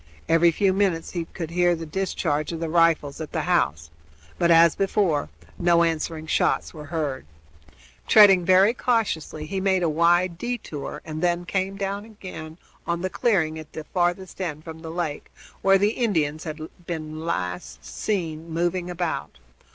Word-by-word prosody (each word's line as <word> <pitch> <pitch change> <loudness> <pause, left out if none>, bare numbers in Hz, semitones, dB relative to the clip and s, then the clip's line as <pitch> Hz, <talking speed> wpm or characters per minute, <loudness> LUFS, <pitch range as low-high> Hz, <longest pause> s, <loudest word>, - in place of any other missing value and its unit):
Every 165 +1 +5
few 190 +3 +2
minutes 185 -4 0
he 170 -2 -3
could 165 -1 -7
hear 175 0 +3
the 165 0 -6
discharge 155 -3 -1
of 165 - -4
the 165 -1 -3
rifles 165 -3 +2
at 155 - -7
the - - 0
house; 75 +2 0 0.5
but, 170 - +3
as 165 -1 +7
before, 190 - +1 0.3
no 170 -1 +4
answering 160 -1 -2
shots - - +1
were 150 -2 -9
heard. 145 - -3 0.8
Treading 195 -4 +7
very 190 +5 +5
cautiously, 205 - -1
he 190 +4 -3
made 190 -2 +2
a 165 - +2
wide 170 +2 +2
détour 220 - -5
and 155 0 -5
then 175 0 +1
came 190 +2 -2
down 200 +1 -3
again 185 -7 -9 0.3
on 170 0 -1
the 185 - -2
clearing 160 -9 +1
at 155 -1 -12
the 155 - -5
end 155 - -17
furthest 180 +1 -1 0.2
from 160 -1 -9
the 160 - -7
lake, 165 -3 -4 0.3
where 195 0 +5
the 205 +2 +2
Indians 160 - -1
had 155 -1 -5 0.3
been 155 -2 -5
last 90 - -4
seen 165 -6 -3
moving 175 +2 -1
about. 170 - -3
170 Hz, 165 wpm, -24 LUFS, 155-185 Hz, 0.8 s, as